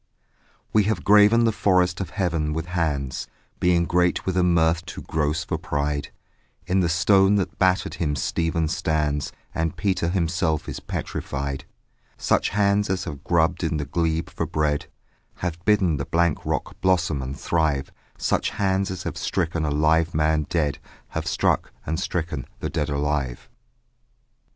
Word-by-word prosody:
We 105 -2 +4
have 105 -5 0
graven 105 +3 +6
the 115 - +4
forest 90 -3 +2
of 95 - -4
heaven 85 -5 -1
with 80 +2 -3
hands, 75 -6 -2 0.3
Being 85 -1 +3
great 90 +1 +1
with 95 - -1
a 90 - +3
mirth 85 -1 +3
too - - -7
gross 80 +1 -1
for - - -3
pride, 75 0 -2 0.5
In 95 +1 +1
the 85 -2 +2
stone 95 +4 +4
that 100 -2 -1
battered 95 0 +2
him 75 -4 -1
Stephen 80 +3 0
stands 75 -3 -1 0.2
And 80 -1 -2
Peter 95 -4 0
himself 85 -3 0
is - - -5
petrified: 70 0 -4 0.5
Such - - +1
hands 100 0 +2
as 95 -1 0
have 70 -2 -7
grubbed 85 +1 +2
in 80 -1 0
the 75 - -2
glebe 80 +2 -1
for - - -3
bread 75 -1 0 0.5
Have 85 -1 -4
bidden 95 -7 +3
the 70 - -3
blank 85 -1 +1
rock - - -3
blossom 85 -6 +2
and 65 +2 -6
thrive, 75 -5 0 0.3
Such - - 0
hands 95 -1 0
as 95 -2 -5
have - - -4
stricken 85 -3 -1
a - - 0
live 80 +2 +2
man 75 -1 +2
dead 75 -3 0 0.3
Have - - -4
struck, - - +1
and 80 +2 -2
stricken 80 -7 -3
the - - -3
dead 75 - -1
alive. 70 -3 -2
85 Hz, 160 wpm, -24 LUFS, 75-90 Hz, 0.5 s, graven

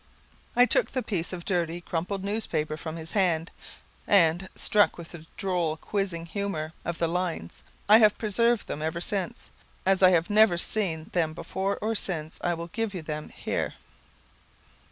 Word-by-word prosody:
I 245 +1 +7
took - - +2
the 255 -2 -1
piece 180 -6 -2
of 175 -2 -6
dirty 175 -3 -1
crumpled 180 +3 -3
newspaper 200 -7 -2
from 160 0 -6
his 160 -1 -7
hand; 175 -5 +1 0.6
and, 180 -1 +4
struck 210 -1 +3
with 170 -1 -9
the 160 -2 -11
droll 175 -5 -1
quizzing 185 -3 -3
humour 165 -4 -3
of 170 -1 -3
the 165 - +1
lines, 170 - -3 0.3
I 215 +2 +8
have 215 -2 +5
preserved 230 +1 +2
them 150 - -4
ever 160 +2 -2
since. 185 0 -2 0.3
As 195 0 +3
I 185 - +8
have 170 -2 +3
never 210 -4 +5
seen 170 -5 0
them 160 -3 0
before 190 +3 -2
or 220 +1 +1
since, 160 -7 -3
I 175 -1 +1
will 165 0 -5
give 220 +1 -3
you 175 - -5
them 155 -1 -5
here. - - -3
175 Hz, 170 wpm, -27 LUFS, 165-200 Hz, 0.6 s, I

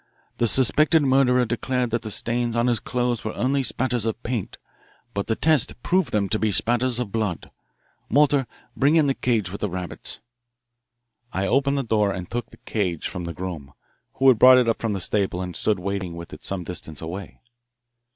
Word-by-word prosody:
The 120 - +3
suspected 145 - +4
murderer 130 -2 +3
declared 125 +1 -1
that 115 -1 -2
stains 120 +2 0
on 120 0 +2
his 120 -3 +2
clothes 120 -2 -1
were 110 - -4
only 135 +3 +1
spatters 125 -2 0
of 110 - -3
paint, 115 -5 -3 0.6
but 100 -2 -3
the 110 - +1
test 155 0 +2
proved 180 -8 +1
them 105 -2 +1
to 110 - 0
be 110 -1 +1
spatters 120 +5 +1
of 120 -5 -3
blood. 105 -6 -3 0.6
Walter, 140 0 +3 0.3
bring 145 +4 +3
in 160 -2 +5
the 135 - +2
cage 110 -8 0
with 100 - -7
the 105 - -1
rabbits." 90 0 -4 1.1
I 95 +1 -1
opened 140 +6 +2
the 135 - 0
door 105 -3 +1
and 90 -1 -5
took 120 +3 -4
the - - -16
cage 90 -7 -2
from 90 -1 -6
the 85 - -5
groom, 80 -6 -6 0.4
who 135 - +2
had 125 -5 +6
brought 130 +1 +9
it 125 -2 +3
up 115 - 0
from 115 -2 -1
the 100 - -2
stable 95 -1 -1
and 90 -1 -5
stood 105 -2 +1
waiting 95 -1 -4
with 85 0 -9
it - - -11
some 95 -2 -3
distance 80 -3 -6
away. 90 +4 -7
115 Hz, 195 wpm, -24 LUFS, 95-125 Hz, 1.1 s, brought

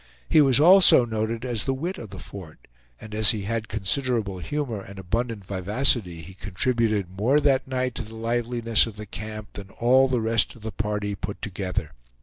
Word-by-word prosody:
He 155 - +5
was 135 -2 +4
also 180 -5 +7
noted 110 +1 -3
as 120 -4 0
the 135 - 0
wit 170 +8 -4
of 110 - -9
the 95 - -10
Fort; 85 -1 -11 0.3
and 110 - -11
as 110 0 +4
he 105 -3 +1
had 110 +2 -3
considerable 110 -1 -1
humor 125 - -3
and 100 0 -12
abundant 110 +2 -3
vivacity, 95 -2 0
he 95 +3 -11
contributed 105 +1 -1
more 130 +8 +3
that 135 -2 +2
night 130 -1 -2
to - - -5
the 110 +1 -11
liveliness 115 0 0
of 110 - -8
the 105 0 -8
camp 105 +1 -8
than 100 -1 -9
all 130 +6 +3
the 130 -2 0
rest 115 0 +1
of 115 - -16
the 110 - -4
party 105 -1 -3
put 100 +1 -6
together. 90 -6 -4
110 Hz, 190 wpm, -24 LUFS, 100-125 Hz, 0.3 s, also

